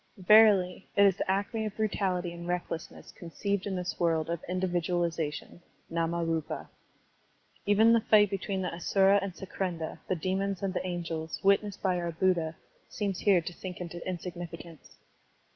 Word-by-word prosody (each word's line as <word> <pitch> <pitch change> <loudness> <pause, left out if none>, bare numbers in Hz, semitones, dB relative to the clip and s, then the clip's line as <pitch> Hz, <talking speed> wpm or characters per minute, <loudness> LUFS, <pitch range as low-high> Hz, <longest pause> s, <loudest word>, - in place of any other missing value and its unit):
Verily, 195 -2 +5
it 200 - +6
is 195 -2 +4
the - - -3
acme 200 +3 0
of 210 - -7
brutality 190 -5 -1
and 170 0 -8
recklessness 175 -2 -4
conceived 200 +4 -3
in 195 - -2
this 180 0 -4
world 165 -1 +1
of 170 - -3
indi 185 +1 0
vidualization 170 -3 -2 0.3
(ndmariipa). 165 -1 -1 1.0
Even 220 +3 +5
the 230 - +4
fight 210 -2 +5
between 195 -1 -2
the 180 - -1
Astira 195 +3 +3
and 190 -3 -5
Sakrendra, 180 -4 -4
the 185 - 0
demons 190 +3 -2
and 195 -1 -1
the - - -2
angels, 165 -4 -4
witnessed 200 0 +2
by 185 -2 +1
our 170 -1 -2
Buddha, 165 -2 +1 0.3
seems 200 -3 -3
here 195 -4 +4
to 170 +2 -6
sink 180 +1 -8
into 175 -1 -6
insignificance. 175 -2 -7
180 Hz, 155 wpm, -29 LUFS, 170-195 Hz, 1.0 s, it